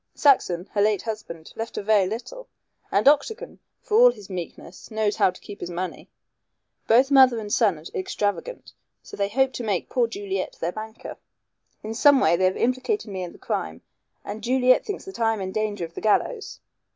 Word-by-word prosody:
Saxon, 185 - +3
her 205 - +1
late 210 -2 +2
husband, 210 -8 -7
left 225 +1 -5
her - - -3
very 205 -2 +3
little, 250 - -7 0.4
and - - +2
Octagon, 300 - +2 0.2
for 430 - +1
all - - +9
his 205 - -8
meekness, 180 0 -8
knows 215 -1 -1
how - - +4
to 185 - -9
keep 205 - -11
his - - -5
money. 180 +1 -5 0.8
Both 255 +5 +4
mother 260 -3 +6
and 210 -1 -4
son 205 -8 +3
are 155 - -13
extravagant, 205 - -3 0.3
so - - -10
they 200 0 -1
hope 265 +4 +1
to 245 - -5
make 205 -5 -2
poor 245 -3 +2
Juliet 200 -4 -4
their 170 - -1
banker. 220 +3 -8 0.7
In 215 +1 -4
some 285 +4 +5
way 170 - +4
they 185 +2 +1
have 185 - +1
implicated 255 - -1
me 190 -1 -4
in 175 -1 -5
the - - -15
crime, 80 +1 -4 0.4
and 210 +2 -6
Juliet 255 +1 +3
thinks 410 - -6
that 385 -7 -9
I 225 -1 +2
am - - -7
in 190 -1 -4
danger 205 -3 -2
of 165 - -13
the - - -7
gallows. 415 - 0
215 Hz, 200 wpm, -24 LUFS, 190-255 Hz, 0.8 s, all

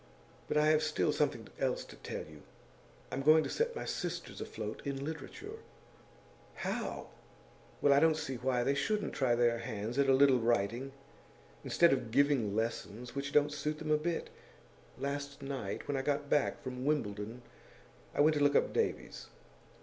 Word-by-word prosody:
But - - 0
I 150 - +5
have 155 0 +4
still 155 0 +1
something - - 0
else - - 0
to - - -12
tell - - -5
you. 75 -1 -13 0.7
I'm 135 - -2
going 155 +2 +6
to - - -4
set 475 +1 0
my - - -4
sisters 175 -1 -4
afloat 110 -1 -5
in 140 0 -3
literature.' 160 - -7 1.0
'How!' - - -3 0.7
'Well, 145 - +6
I 140 - +6
don't 160 0 +4
see 135 -4 -4
why 125 0 +1
they 140 - +2
shouldn't 210 +9 -1
try 125 -3 +2
their 120 -1 +2
hands 115 +1 -4
at 140 -1 +4
a - - +7
little 135 -2 +6
writing, 120 +3 0 0.7
instead 170 -3 +4
of 125 -4 -2
giving 130 -5 +2
lessons, 115 +1 -3
which 140 +1 -3
doesn't 150 0 +4
suit 150 +1 -2
them 155 0 -3
a 150 - +5
bit. 165 +2 -2 0.7
Last 140 0 -4
night, 135 -1 -4
when 145 - -1
I 135 - 0
got 145 +1 -1
back 145 0 +1
from 130 -1 -5
Wimbledon, 115 -5 -2 0.7
I - - +3
went 155 +1 +5
to 145 - +2
look 145 0 +4
up - - +3
Davies. - - -2
140 Hz, 175 wpm, -33 LUFS, 120-150 Hz, 1.0 s, a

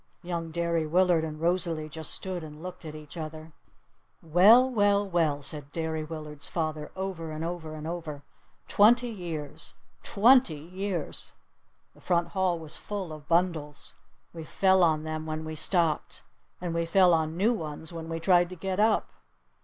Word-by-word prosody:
Young 170 -2 -3
Derry 170 -1 -1
Willard 175 0 +3
and 155 -1 -5
Rosalee 165 -2 0
just 160 0 -6
stood 185 -3 -3
and 155 +1 -10
looked 180 -2 -8
at 155 -1 -7
each 155 +2 -11
other. 155 0 -7 0.7
"Well 200 +10 +7
well 205 -4 +2
well!" 160 -6 +1
said 145 0 -5
Derry 160 -1 -2
Willard's 150 -2 -7
father 155 -2 -3
over 190 -4 -4
and 155 +1 -4
over 165 -2 -5
and 155 0 -7
over. 160 -4 -5 0.4
"Twenty 240 +4 +5
years! 170 -9 -6 0.3
Twenty 240 -4 +4
years!" 180 +1 -5 0.6
The - - -20
front 170 -1 +1
hall 190 -3 +1
was 160 -2 -5
full 195 -6 -5
of 150 -1 -11
bundles! 165 -4 -1 0.4
We 165 -1 -7
fell 190 +3 +3
on 155 -2 +2
them 155 0 -4
when 155 0 -4
we 155 - -5
stepped. 165 -1 0 0.4
And 175 -2 -3
we 170 0 -1
fell 180 0 +5
on 160 0 0
new 215 +6 +3
ones 160 -3 -6
when 165 -1 -6
we 165 0 -3
tried 175 0 +4
to 185 - -8
get 190 +2 -3
up. 215 +1 +3
165 Hz, 165 wpm, -28 LUFS, 155-185 Hz, 0.7 s, Well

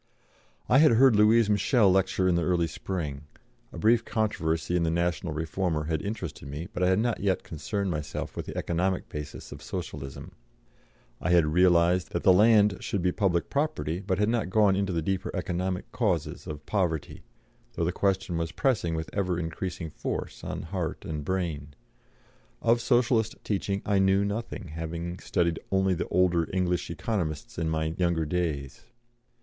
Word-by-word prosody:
I 130 - +5
had 155 -5 +6
heard 125 0 +6
Louise 110 +2 +5
Michelle 105 +1 +3
lecture 95 0 +2
in 90 - +3
the 85 - +2
early 85 0 +2
spring; 75 -4 -5 0.4
a - - -9
brief 115 +2 +3
controversy 90 -8 -1
in 90 - +2
the 85 - +1
National 85 0 -1
Reformer 80 +1 -1
had 80 0 -1
interested 95 -9 -5
me, 75 +5 -5
but 90 - -4
I 90 - +4
had 95 0 +3
not 115 +1 0
yet 95 -2 0
concerned 95 +3 -3
myself 75 -3 -4
with - - -5
the - - -6
economic 90 +2 -1
basis 75 -1 -7
of - - -9
Socialism; 70 -6 -6 0.9
I - - -1
had 85 -2 +5
realised 90 +2 +3
that 85 - -1
the 95 - +7
land 105 -1 +5
should 100 -4 -2
be 90 - +3
public 90 -3 0
property, 140 - -1
but 95 -2 -1
had 105 +1 +2
not 115 -4 0
gone 100 -1 +4
into 100 -1 0
the 85 -2 -1
deeper 95 +2 -1
economic 90 0 -2
causes - - -1
of 75 -1 -7
poverty, 85 -7 -1 0.5
though 85 - -1
the 90 - +1
question 95 -2 0
was 80 -1 -2
pressing 100 -11 0
with 80 0 -3
ever 95 -3 0
increasing 85 0 -4
force - - -5
on - - -4
heart - - -4
and 75 -2 -4
brain. 75 -5 -3 0.8
Of 120 +1 +3
Socialist 120 -3 +2
teaching 100 -1 -2
I 100 -1 +2
knew 95 +1 +3
nothing, 100 -3 -4
having 85 +3 -5
studied 85 -4 0
only 95 -1 +3
the 90 - -2
older 90 -3 +2
English 90 -2 0
Economists 85 -10 -3
in 80 -1 0
my 80 0 -1
younger 85 -3 +1
days. 75 -5 -3
90 Hz, 170 wpm, -27 LUFS, 80-100 Hz, 0.9 s, the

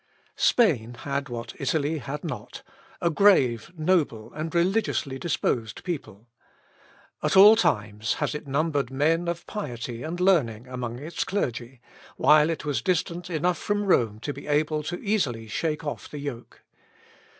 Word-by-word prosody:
Spain 125 - +3
had 140 -1 -3
what 120 -1 -6
Italy 150 +3 0
had 140 +3 -6
not 160 - -6 0.4
a 170 - +2
grave, 145 - +4
noble, 155 -10 0
and 155 +2 -5
religiously 170 -7 0
disposed 115 -9 -1
people. 125 - -6 0.9
At - - +1
all 210 +3 +10
times 110 - 0
has - - -1
it 150 -1 -6
numbered 140 -2 0
men 160 +6 +1
of 170 0 -3
piety 120 - -5
and 165 +4 -4
learning 135 - +2
among 125 -2 -5
its 155 +6 -3
clergy, 125 - -3 0.4
while 150 +1 +5
it 165 - -3
was 140 -6 -1
distant 175 +2 -1
enough 175 +1 0
from 205 -1 -1
Rome 115 - +2
to 145 - -3
be 140 - -10
able 150 +1 +1 0.2
easily 155 - 0
to - - -15
shake 155 +4 -2
off 145 - -5
the 150 - -7
yoke. 140 -5 -7
150 Hz, 150 wpm, -26 LUFS, 120-170 Hz, 0.9 s, all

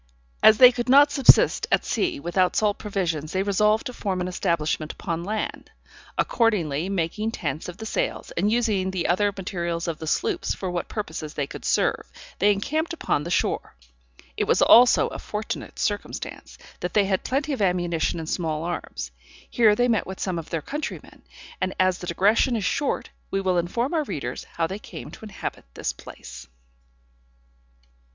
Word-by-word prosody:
As 220 - +7
they 250 +1 +9
could 240 0 -3
not 285 +2 +7
subsist 275 -3 +5
at - - +2
sea 350 -5 -1
without 185 -5 +1
salt 210 -1 +1
provisions, 170 -7 -2
they 190 0 +1
resolved 210 +2 +2
to 250 - -5
form 195 -5 -2
an 180 - -2
establishment 155 -3 -1
upon 170 0 -4
land. 210 +3 -4 0.5
Accordingly 180 - +1
making 195 +4 -1
tents 180 -7 -4
of 180 - -9
the 220 - -7
sails, - - -2
and 200 +5 0
using 215 -5 +1
the 185 -2 -2
other 200 +4 +2
materials 170 -3 -3
of 165 -2 -3
the 160 - -6
sloops - - 0
for 185 -2 -4
what 175 -1 -3
purposes 160 -7 -5
they 145 - -1
could - - -10
serve, - - 0 0.3
they 205 +2 +5
encamped 310 - -1
upon 295 - -1
the 165 - -5
shore. 175 - -1 0.6
It - - 0
was - - +3
also 245 +1 +7
a - - -7
fortunate 210 +1 -5
circumstance, 205 -2 -4 0.2
that 180 -1 -4
they 205 -2 +5
had 190 -1 0
plenty 280 +3 -1
of 260 - -3
ammunition 175 -4 +1
and 160 - -6
small 160 -2 -2
arms. 170 - -5 0.4
Here 220 -3 +4
they 245 +3 +2
met 225 -4 +1
with 190 0 -7
some 180 -3 -2
of 160 - -9
their 165 -3 -3
countrymen; 295 - -6 0.4
and 185 - -1
as 185 -1 +2
the 180 - -7
digression 210 +8 +3
is 210 -5 -1
short, 285 +7 -1 0.2
we 195 - 0
will 185 -2 +1
inform 235 - -1
our 320 -2 +1
readers 140 - -5
how 165 - +1
they 190 +5 -5
came - - -9
to - - -11
inhabit 210 - -6
this - - -2
place. - - -11
190 Hz, 180 wpm, -24 LUFS, 170-220 Hz, 0.6 s, they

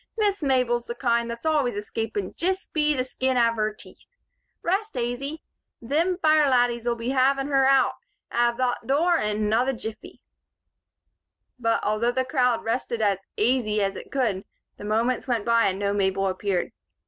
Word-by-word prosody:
"Miss 410 -3 +1
Mabel's 250 -4 +1
the 235 - -4
kind 235 -2 0
thot's 235 +5 -7
always 290 -8 +1
escapin' 210 -1 -4
jist 375 +3 -2
be 300 -1 +2
the 255 - 0
skin 260 0 -1
av 230 -1 +3
her 215 -1 0
teeth. 215 - -15 0.6
Rest 390 -1 -1
aisy. 250 +6 -3 0.4
Thim 335 +7 +1
fire 310 -4 +4
laddies'll 240 -2 +2
be 235 +1 -4
havin' 270 +1 +2
her 270 -1 +3
out 270 0 +4 0.4
av 235 0 +1
thot 245 -2 -1
dure 330 +5 +3
in 210 0 -1
another 225 +5 +1
jiffy." 220 -2 -8 1.4
But, 230 -1 +1
although 215 +3 +1
the 260 +1 -1
crowd 250 -4 +1
rested 235 0 -2
as 200 -3 +1 0.2
"aisy" 215 -2 +1
as 195 0 -1
it - - -9
could, 225 -9 0 0.3
the - - -9
moments 230 +5 0
went 235 -5 -1
by 230 0 +3
and 190 - -1
no 200 0 -1
Mabel 195 -1 0
appeared. 190 -1 -1
240 Hz, 165 wpm, -25 LUFS, 220-270 Hz, 1.4 s, fire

